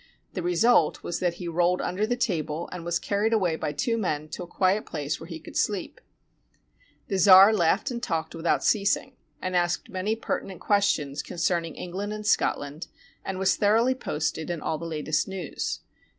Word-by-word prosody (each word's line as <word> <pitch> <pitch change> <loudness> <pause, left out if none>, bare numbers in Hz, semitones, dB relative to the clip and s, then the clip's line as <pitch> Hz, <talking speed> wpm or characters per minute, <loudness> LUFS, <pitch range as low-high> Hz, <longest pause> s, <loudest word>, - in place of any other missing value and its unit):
The 185 - -3
result 175 +1 +3
was 175 - -3
that 175 -2 0
he 175 0 -6
rolled 175 +2 +2
under 205 +4 -1
the 245 - +1
table, 170 - -2
and 180 -2 -6
was 170 0 0
carried 210 +3 0
away 180 -7 +2
by 150 - -3
two 230 +10 -1
men 155 -6 -2
to 160 - -6
a 175 - -6
quiet 190 +4 +1
place 145 +1 -4
where 160 - -9
he 165 -2 -7
could - - -12
sleep. 200 -4 -1 1.1
The 195 -2 -1
czar 195 +2 +9
laughed 190 +4 +2
and 235 -1 -4
talked 165 -7 -2
without 165 0 0
ceasing, 215 +5 +1 0.3
and 185 0 -2
asked 175 -1 0
many 195 +3 -1
pertinent 195 -4 -4
questions 165 -9 +1
concerning 170 -1 -1
England 195 +4 -4
and 215 0 -6
Scotland, 150 -6 0 0.4
and 190 - -4
was 190 0 +2
thoroughly 225 +5 +3
posted 160 -9 -3
in 170 -2 -2
all 155 0 -2
the 170 - -5
latest 155 -1 -1
news. 190 -5 -4
180 Hz, 180 wpm, -26 LUFS, 165-205 Hz, 1.1 s, czar